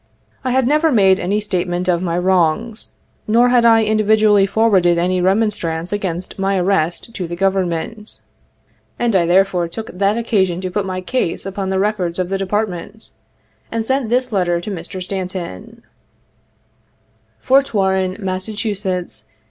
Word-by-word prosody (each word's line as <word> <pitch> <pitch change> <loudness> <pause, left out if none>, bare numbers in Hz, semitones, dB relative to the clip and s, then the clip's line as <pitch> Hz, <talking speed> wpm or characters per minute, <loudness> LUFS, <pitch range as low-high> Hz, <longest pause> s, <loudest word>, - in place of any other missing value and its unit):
I 260 - -1
had 260 0 +2
never 305 +3 +3
made 195 -5 +4
any 200 +4 0
statement 180 -3 -1
of 175 -1 +1
my 170 -2 -1
wrongs, 185 +5 0 0.3
nor 235 +3 +4
had 245 -1 +4
I 225 -1 +6
individually 215 -1 +3
forwarded 195 -5 +3
any 180 +1 +1
remonstrance 185 -4 0
against 185 -2 -4
my 195 0 +1
arrest 180 +3 -1
to 185 -6 -4
the 170 - -5
Government, 195 +3 -2 0.8
and 235 -3 0
I 170 -3 +3
therefore 180 -1 +2
took 215 +7 -7
that 200 +4 +1
occasion 195 -7 0
to 185 -1 -4
put 195 +1 -2
my 185 0 -3
case 185 -4 -2
upon 195 0 -4
the 190 - 0
records 190 -4 -1
of 180 -1 -2
the 195 0 -1
Department, 205 +1 -3 0.6
and 225 -1 -2
sent 265 -2 0
this 250 +1 0
letter 175 -4 +1
to 190 +5 -6
Mr. 185 +1 -6
Stanton: 185 - -6 0.7
" 110 0 -42
Fort 270 +1 +2
Warren, 190 -2 0
Mass. 190 0 -3
190 Hz, 150 wpm, -18 LUFS, 180-215 Hz, 0.8 s, I